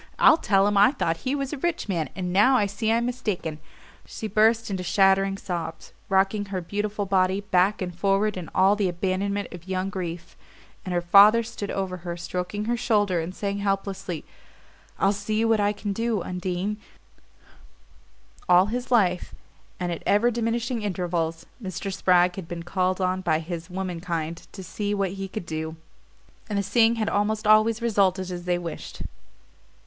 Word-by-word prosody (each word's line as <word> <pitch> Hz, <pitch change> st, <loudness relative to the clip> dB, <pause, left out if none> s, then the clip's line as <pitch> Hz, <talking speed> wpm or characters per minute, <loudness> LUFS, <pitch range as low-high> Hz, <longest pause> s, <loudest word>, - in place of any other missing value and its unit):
I'll 320 Hz, -, +7 dB
tell 195 Hz, -9 st, +3 dB
him 205 Hz, 0 st, +2 dB
I 205 Hz, +5 st, +7 dB
thought 165 Hz, -, -1 dB
he 260 Hz, +11 st, -2 dB
was 275 Hz, 0 st, -3 dB
a 290 Hz, -, -5 dB
rich 345 Hz, -2 st, -1 dB
man, 170 Hz, -6 st, -1 dB
and 180 Hz, -2 st, -3 dB
now 255 Hz, +7 st, +5 dB
I 210 Hz, -, +2 dB
see 210 Hz, +3 st, -1 dB
I'm 230 Hz, +1 st, +2 dB
mistaken 210 Hz, -11 st, -3 dB, 0.2 s
" -, -, -22 dB, 0.2 s
She 220 Hz, -, -7 dB
burst 220 Hz, +1 st, +2 dB
into 190 Hz, -2 st, -2 dB
shattering 195 Hz, +1 st, +3 dB
sobs, 170 Hz, -4 st, -5 dB, 0.2 s
rocking 195 Hz, +2 st, +2 dB
her 195 Hz, -2 st, -3 dB
beautiful 205 Hz, +3 st, -3 dB
body 190 Hz, 0 st, +2 dB
back 195 Hz, 0 st, +2 dB
and 180 Hz, -2 st, -5 dB
forward 195 Hz, +3 st, +1 dB
in 180 Hz, -3 st, -6 dB
all 195 Hz, +2 st, +5 dB
the 200 Hz, -3 st, 0 dB
abandonment 195 Hz, +3 st, -2 dB
of 175 Hz, 0 st, -11 dB
young 190 Hz, +1 st, -2 dB
grief; 175 Hz, -3 st, -6 dB, 0.5 s
and 185 Hz, -, -5 dB
her 175 Hz, -1 st, +1 dB
father 205 Hz, +6 st, +7 dB
stood 205 Hz, -2 st, -6 dB
over 190 Hz, -2 st, -3 dB
her, 175 Hz, 0 st, -6 dB
stroking 180 Hz, +4 st, -4 dB
her 240 Hz, +2 st, 0 dB
shoulder 210 Hz, -7 st, +1 dB
and 170 Hz, +3 st, -5 dB
saying 200 Hz, 0 st, -3 dB
helplessly: 195 Hz, -3 st, -3 dB, 0.7 s
"I'll 195 Hz, -, +3 dB
see 215 Hz, +2 st, -1 dB
what 225 Hz, -1 st, +3 dB
I 205 Hz, 0 st, +2 dB
can 205 Hz, -1 st, -4 dB
do, 225 Hz, -2 st, -1 dB
Undine 185 Hz, +3 st, -3 dB, 0.9 s
" -, -, -29 dB
All 180 Hz, +1 st, +7 dB
his 245 Hz, 0 st, -3 dB
life, 185 Hz, -8 st, +2 dB, 0.4 s
and 180 Hz, -1 st, -2 dB
at 170 Hz, -, -4 dB
ever 230 Hz, +4 st, +4 dB
diminishing 235 Hz, +1 st, -1 dB
intervals, 170 Hz, -4 st, -2 dB, 0.2 s
Mr. 195 Hz, 0 st, -4 dB
Spragg 180 Hz, -1 st, +3 dB
had 185 Hz, -4 st, -6 dB
been 170 Hz, 0 st, -6 dB
called 185 Hz, +1 st, 0 dB
on 185 Hz, 0 st, 0 dB
by 155 Hz, -, +1 dB
his 165 Hz, 0 st, -6 dB
womenkind 170 Hz, -3 st, -4 dB
to 190 Hz, -, -9 dB
"see 205 Hz, +3 st, -3 dB
what 195 Hz, -2 st, 0 dB
he 195 Hz, 0 st, -5 dB
could 195 Hz, -1 st, -6 dB
do"; 160 Hz, 0 st, -4 dB, 0.7 s
and 205 Hz, -, -1 dB
the 200 Hz, -, +1 dB
seeing 225 Hz, +4 st, +3 dB
had 220 Hz, -2 st, -1 dB
almost 215 Hz, +1 st, 0 dB
always 215 Hz, +2 st, +4 dB
resulted 190 Hz, -4 st, +1 dB
as 175 Hz, -1 st, -6 dB
they 180 Hz, -1 st, +1 dB
wished. 170 Hz, -2 st, -7 dB
195 Hz, 180 wpm, -25 LUFS, 180-210 Hz, 0.9 s, I'll